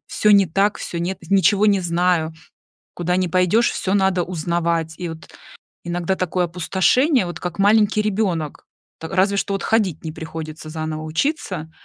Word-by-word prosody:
всё 210 - +2
не 200 -2 +6
так, 195 +5 +1
всё 170 - -5
нет 175 +2 -3
ничего 200 +1 +4
не 200 -2 +3
знаю, 170 -2 +1 0.6
куда 175 +1 -1
не 185 -1 0
пойдешь 185 +6 +3
всё 190 - -2
надо 190 -2 +2
узнавать. 170 -1 -1
И 175 - -4
вот 160 0 -10 0.6
иногда 175 +2 -1
такое 180 -1 -1
опустошение, 190 - +2
вот 175 - -6
как 180 0 -5
маленький 210 +1 +4
ребенок, 190 -8 -2 0.3
та 160 - -6
разве 195 +4 +1
что 200 - -1
вот 195 - -3
ходить 200 -9 0
не 160 - -4
приходится 160 0 -7
заново 155 0 -4
учиться. 165 - -2
180 Hz, 160 wpm, -21 LUFS, 165-200 Hz, 0.6 s, не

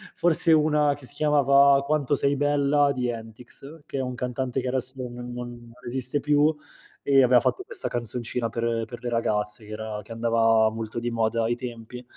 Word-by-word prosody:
forse 170 -1 +3
una 150 -1 +3
che 140 -2 -13
si 130 - -6
chiamava 140 -2 +4
“Quanto 145 -1 0
6 140 +1 +1
bella“ 145 0 +2
di 125 -2 -2
Entics, 120 +7 -8
che - - -6
è - - 0
un 125 -1 -4
cantante 125 +1 -3
che - - -4
adesso 130 0 -2
non 125 -1 -6
non 120 0 -7 0.2
non 120 -1 -13
esiste 130 +3 -1
più, 150 +2 +2 0.5
e 135 -1 +5
aveva 125 0 +5
fatto 385 - -1
questa 430 -2 0
canzoncina 120 0 -2
per 115 0 -2
per 120 +1 -10
le 120 - -2
ragazze, 105 -2 -1
che 105 - -12
era 110 -1 -5
che 105 - -15
andava 115 -1 +3
molto 115 +1 -5
di 120 0 -3
moda 115 0 0
ai 115 +1 0
tempi. 120 0 -8
125 Hz, 190 wpm, -25 LUFS, 115-140 Hz, 0.5 s, e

